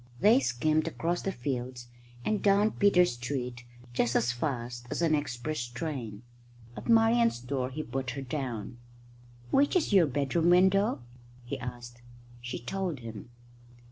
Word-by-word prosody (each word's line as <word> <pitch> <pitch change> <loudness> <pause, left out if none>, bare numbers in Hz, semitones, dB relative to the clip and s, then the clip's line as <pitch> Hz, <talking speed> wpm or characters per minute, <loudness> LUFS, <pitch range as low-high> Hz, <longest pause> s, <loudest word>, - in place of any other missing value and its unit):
They 225 +5 +6
skimmed 155 - +1
across 170 +2 -1
the 195 - -2
fields 125 -4 -4 0.4
and 215 -1 0
down 205 +2 +4
Peter 200 -3 +4
Street 125 -2 -4 0.3
just 120 0 +1
as 120 0 +3
fast 120 -2 -4
as 170 - -2
an 160 -2 +3
express 145 -1 -2
train. 120 -4 -5 0.5
At - - -8
Marian's 230 - +4
door 125 +1 -2
he 155 +4 -5
put 130 0 -3
her 135 - -4
down. 125 -4 -4 0.7
"Which 285 +5 +3
is 330 - +2
your 180 -5 +6
bedroom 145 +5 +1
window?" 190 - +4 0.4
he 130 +2 -4
asked. 120 -1 -8 0.4
She 120 0 -4
told 175 +1 -3
him. 115 -2 -8
135 Hz, 140 wpm, -29 LUFS, 120-180 Hz, 0.7 s, They